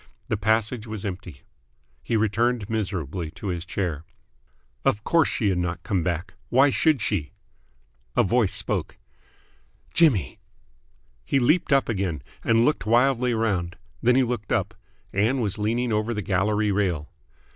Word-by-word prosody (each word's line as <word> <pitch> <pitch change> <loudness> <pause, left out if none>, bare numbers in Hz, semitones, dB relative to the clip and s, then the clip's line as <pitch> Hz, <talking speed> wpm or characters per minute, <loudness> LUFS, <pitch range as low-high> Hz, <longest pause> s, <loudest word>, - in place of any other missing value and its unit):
The - - +1
passage 110 +2 0
was 110 -2 -5
empty. 95 -7 -7 0.6
He 115 - 0
returned 110 +1 +1
miserably 90 -6 -3
to 100 - -5
his 85 -1 -3
chair. 85 -6 -2 0.8
Of 105 - +1
course 165 +1 +3
she 105 - 0
had 90 -2 0
not 85 0 -3
come 100 -5 0
back. 90 +1 -3 0.2
Why 135 +3 +5
should 150 -7 +2
she? 100 -5 -1 0.8
A - - +4
voice 110 0 +2
spoke. 100 -3 -2 1.0
"Jimmy!" 115 - +3 0.8
He 100 - +1
leaped 155 +7 +2
up 135 -1 +4
again, 95 - -2 0.2
and 115 +1 +3
looked 150 -6 0
wildly 125 +1 +3
round. 95 -6 -1 0.3
Then 125 +1 +4
he 130 - +4
looked 120 -4 -3
up. - - 0 0.4
Ann 110 +7 +2
was 105 -3 -1
leaning 115 +3 0
over 110 +2 0
the 105 - -3
gallery 105 +3 +1
rail. 90 -7 -1
105 Hz, 145 wpm, -25 LUFS, 95-120 Hz, 1.0 s, Why